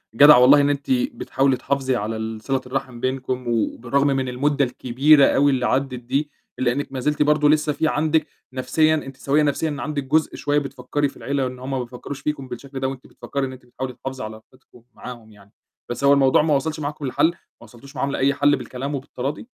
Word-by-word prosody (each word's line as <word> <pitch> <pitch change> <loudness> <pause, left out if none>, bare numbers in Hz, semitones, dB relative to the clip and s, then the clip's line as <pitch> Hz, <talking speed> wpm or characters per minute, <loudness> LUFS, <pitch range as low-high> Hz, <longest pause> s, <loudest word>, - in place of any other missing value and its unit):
جدعة 145 -1 +9
والله 140 +3 +7
إن 145 - +2
أنتِ 145 - -2
بتحاولي 235 - +1
تحافظي 135 -1 -1
على 110 0 -3
ال 110 0 -5
صِلة 135 +1 -1
الرحم 130 -2 -4
بينكم. 130 -1 -3
وبالرغم 120 +4 0
من 135 -2 0
المدّة 140 +2 +1
الكبيرة 135 +4 +4
أو 145 +1 +3
اللي 130 -2 +1
عَدّت 135 0 0
دي، 140 +5 -2 0.3
إلّا 125 -2 +2
إنِّك 140 +2 -3
مازلتِ 150 +3 -1
برضه 150 0 +3
لسه 150 -1 +2
في 160 - 0
عندِك 155 0 +1 0.3
نَفْسيًا 155 +4 +2
أنتِ 135 -3 -6
سويّة 145 +2 +1
نَفْسيًا، 150 +2 0
إن 145 - -5
عندِك 150 -2 -3
جزء 155 +3 +1
شوية 145 0 +1
بتفكّري 140 +1 -2
في - - -17
العيلة 140 -1 -1
إن 125 0 -8
هُم 130 +2 -6
ما 135 - -1
بيفكّروش 125 +3 -7
فيكم 150 -3 -3
بالشكل 130 +2 -8
ده 130 - -1
وأنتِ 135 -1 -7
بتفكّري 140 -1 -4
إن 130 - -8
أنتِ 130 -1 -14
بتحاولي 125 +1 -6
تحافظي 130 -2 -7
على 110 0 -6 0.2
علاقتكُم 125 -2 -21
معاهم 120 -3 -10
يعني. 100 0 -19 0.4
بس 120 - -5
هو 140 0 +6
الموضوع 135 0 +4
ما 150 -2 +2
وَصلش 155 +3 -2
معاكم 145 0 -4
لحَل، 130 +4 +2
ما - - -7 0.3
وَصلتوش 120 +5 -15
معاهم 140 +2 -1
لأي 140 +1 +1
حَل 145 +1 +3
بالكلام 135 +3 -5
وبالتراضي؟ 135 - -5
135 Hz, 210 wpm, -22 LUFS, 125-145 Hz, 0.4 s, جدعة